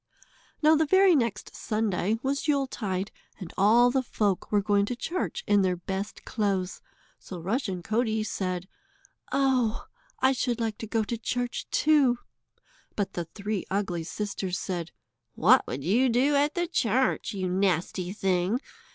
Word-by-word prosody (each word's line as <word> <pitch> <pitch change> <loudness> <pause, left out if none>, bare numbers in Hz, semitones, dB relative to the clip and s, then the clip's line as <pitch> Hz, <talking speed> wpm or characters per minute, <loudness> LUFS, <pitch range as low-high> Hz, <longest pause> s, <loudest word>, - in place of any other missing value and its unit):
Now 310 +1 +6
the 315 0 +2
very 380 +1 +6
next 235 -6 -1
Sunday 215 -1 -1
was 275 +2 -1
Yuletide, 215 -9 -1 0.3
and 185 -4 -8
all 235 +5 +5
the 265 - +2
folk 205 -6 -1
were 210 - +4
going 200 0 +2
to 245 - -2
church 365 - -3
in 205 -1 +4
their 185 -1 +1
best 190 +3 -5
clothes, 195 -4 -1 0.4
so 180 - -8
Rushen 190 - -2
Coatie 220 +1 0
said: 185 -3 -3 0.6
"Oh! 255 -5 +1 0.3
I 260 - +4
should 245 -2 -1
like 225 -2 -2
to 225 - -6
go 225 0 0
to 225 +2 -4
church, 245 +2 -3
too," 290 -5 +3 0.8
but 200 -2 -2
the 175 - -3
three 200 +3 -4
ugly 190 -4 -1
sisters 195 0 -3
said: 175 -3 -4 0.5
"What 240 +10 +5
would 135 +2 -4
you 235 - +3
do 260 +5 +3
at 290 +1 +2
the 350 - +1
church, 255 - 0
you 185 -1 -2
nasty 180 -1 0
thing? 190 +2 0
215 Hz, 150 wpm, -27 LUFS, 190-250 Hz, 0.8 s, Now